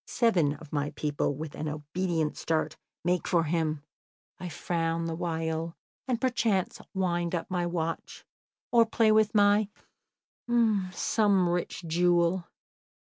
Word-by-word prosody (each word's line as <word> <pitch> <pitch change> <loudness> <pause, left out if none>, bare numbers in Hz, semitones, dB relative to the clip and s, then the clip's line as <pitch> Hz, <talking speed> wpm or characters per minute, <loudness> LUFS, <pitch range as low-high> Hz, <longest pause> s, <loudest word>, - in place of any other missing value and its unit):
Seven 175 - +2
of 155 0 -13
my 145 -1 0
people, 145 -1 -1
with 155 +1 -6
an 155 - -4
obedient 155 +2 -2
start, 160 -1 -1 0.3
make 175 0 +1
for 170 -2 +3
him; 155 -2 -1 0.6
I 180 0 -5
frown 165 0 -1
the 165 - -2
while, 165 0 -2 0.3
and 245 -3 0
perchance 225 -7 0
wind 175 -2 0
up 170 - -4
my 175 -1 0
watch, 165 -1 -4 0.5
or 230 -1 +5
play 220 -1 +3
with 215 0 +3
my 205 0 +4 1.2
some 195 0 +2
rich 175 0 -2
jewel. 175 +1 +2
175 Hz, 130 wpm, -29 LUFS, 160-190 Hz, 1.2 s, or